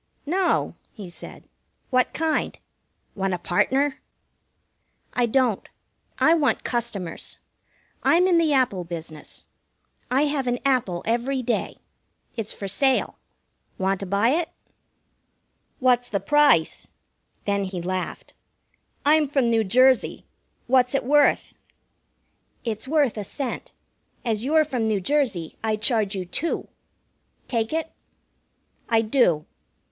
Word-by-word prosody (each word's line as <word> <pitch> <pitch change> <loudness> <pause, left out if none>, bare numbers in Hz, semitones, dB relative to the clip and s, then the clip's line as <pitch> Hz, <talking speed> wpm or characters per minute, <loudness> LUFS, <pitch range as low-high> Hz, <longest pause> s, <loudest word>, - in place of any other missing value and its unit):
"No," 360 +5 +1 0.2
he 200 -6 -10
said. - - -11 0.4
"What 255 -1 +2
kind? 320 0 -1 0.6
Want 195 -2 -1
a - - -4
partner?" 265 +11 +1 1.1
"I 245 -1 +2
don't. 245 -3 +1 0.5
I 320 - +5
want 305 -5 +1
customers. 205 -8 -4 0.6
I'm 350 +2 +4
in 355 -2 +4
the 320 -2 +2
Apple 250 -10 +2
business. 165 -3 -8 0.6
I 265 +3 +3
have 285 -3 -1
an 245 0 +1
apple 240 -10 +1
every 250 +4 0
day. 235 0 -2 0.6
It's 225 -3 -4
for 200 - -6
sale. 260 +7 +1 0.6
Want 190 0 0
to 195 - -5
buy 200 +5 +2
it?" 320 +4 +1 1.3
"What's 250 -3 +2
the 200 - -1
price?" 295 - +3 0.6
Then 200 -1 0
he 185 -1 -5
laughed. 185 +1 -4 0.7
"I'm 305 0 +4
from 270 -4 +1
New 225 -1 +3
Jersey. 255 +5 +3 0.4
What's 250 +1 +3
it - - +1
worth?" 290 +3 +3 1.1
"It's 225 +1 -4
worth 285 -6 +2
a 210 - -3
cent. 265 +5 -5 0.5
As 225 -2 0
you're 310 +3 +3
from 255 -6 -2
New 215 -2 +1
Jersey, 210 - -1
I 220 -1 +1
charge 215 -2 +1
you 185 -1 -3
two. 295 - -3 0.8
Take 225 -2 -1
it?" 320 0 -2 1.0
"I 225 -1 +3
do." 215 - +2
245 Hz, 120 wpm, -24 LUFS, 200-280 Hz, 1.3 s, I